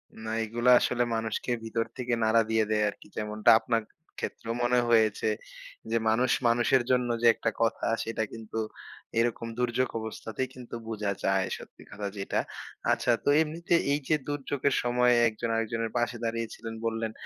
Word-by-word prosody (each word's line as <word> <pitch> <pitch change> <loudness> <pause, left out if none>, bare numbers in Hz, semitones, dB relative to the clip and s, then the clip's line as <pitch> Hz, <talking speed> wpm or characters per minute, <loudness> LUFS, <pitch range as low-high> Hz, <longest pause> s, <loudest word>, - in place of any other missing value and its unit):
না, 110 0 -7
এগুলা 120 +3 +2
আসলে 120 0 +1
মানুষকে 110 +2 -2
ভিতর 115 0 -1
থেকে 125 -1 -2
নাড়া 110 +1 +4
দিয়ে 110 0 +3
দেয় 105 -1 +2
আরকি। 100 - -12
যেমনটা 105 +1 +1
আপনার 115 0 0 0.4
ক্ষেত্রেও 115 - -4
মনে 125 +1 +3
হয়েছে, 110 -2 +3 0.6
যে, 115 - 0
মানুষ 120 +4 +2 0.2
মানুষের 120 +2 +3
জন্য 125 -1 +2
যে, 120 - +5
একটা - - 0
কথা, 115 0 +1 0.2
সেটা 115 -1 -2
কিন্তু 110 0 -5 0.6
এরকম 115 0 0
দুর্যোগ 125 +1 +1
অবস্থাতেই 110 +2 -4
কিন্তু 125 -2 -8
বুঝা 105 -3 -2
যায়, 95 -1 +2
সত্যি - - -13
কথা 100 0 -4
যেটা। 100 - -1 0.5
আচ্ছা, 120 - +2
তো - - +1
এমনিতে 165 +2 -2 0.2
এই 145 - +1
যে, 155 - +4
দুর্যোগের 140 -1 -1
সময় 125 0 +3 0.2
একজন 115 +1 -4
আরেকজনের 115 0 -1
পাশে 120 0 0
দাঁড়িয়েছিলেন 115 0 -4
বললেন, 115 -1 -1
115 Hz, 155 wpm, -28 LUFS, 110-125 Hz, 0.6 s, যে